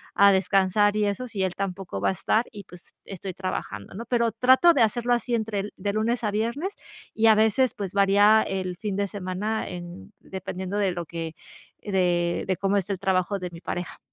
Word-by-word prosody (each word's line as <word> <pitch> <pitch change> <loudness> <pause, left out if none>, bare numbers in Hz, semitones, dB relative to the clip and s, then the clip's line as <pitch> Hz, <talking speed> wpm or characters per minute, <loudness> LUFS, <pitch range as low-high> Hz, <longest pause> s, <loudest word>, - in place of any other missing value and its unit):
a 200 0 +7
descansar 195 +2 +3
y 210 - +2
eso, 205 +5 -2
si 205 -5 -2
él 185 - -1
tampoco 195 -2 -4
va - - +2
a - - +2
estar?". 215 +5 +1
Y 205 -3 -9
pues, 180 -1 -15
estoy 190 -1 -7
trabajando, 185 - -5
¿no? 230 +4 -6
Pero 235 -2 +1
trato 260 - +5
de 265 - +2
hacerlo 240 +2 +2
así 240 0 0
entre 210 -2 -2
de 200 +1 -2
lunes 230 +2 0
a 210 - 0
viernes 235 - -2 0.4
y 225 0 +3
a 220 - +7
veces, 220 +4 +3
pues, 195 -2 -5
varía 205 +2 +5
el 185 -3 -3
fin 205 -1 -3
de 200 0 0
semana 200 +2 -3
en 175 - -9
dependiendo 190 +1 -5
de 200 - +2
lo 175 -1 -5
que 165 -1 -6 0.5
de 175 -3 0
de 185 - +1
cómo 195 +2 +1
esté 200 +1 -1
el 185 - -6
trabajo 190 +1 +1
de 180 -1 -5
mi 170 0 -11
pareja. 175 -1 -5
200 Hz, 205 wpm, -25 LUFS, 185-220 Hz, 0.5 s, a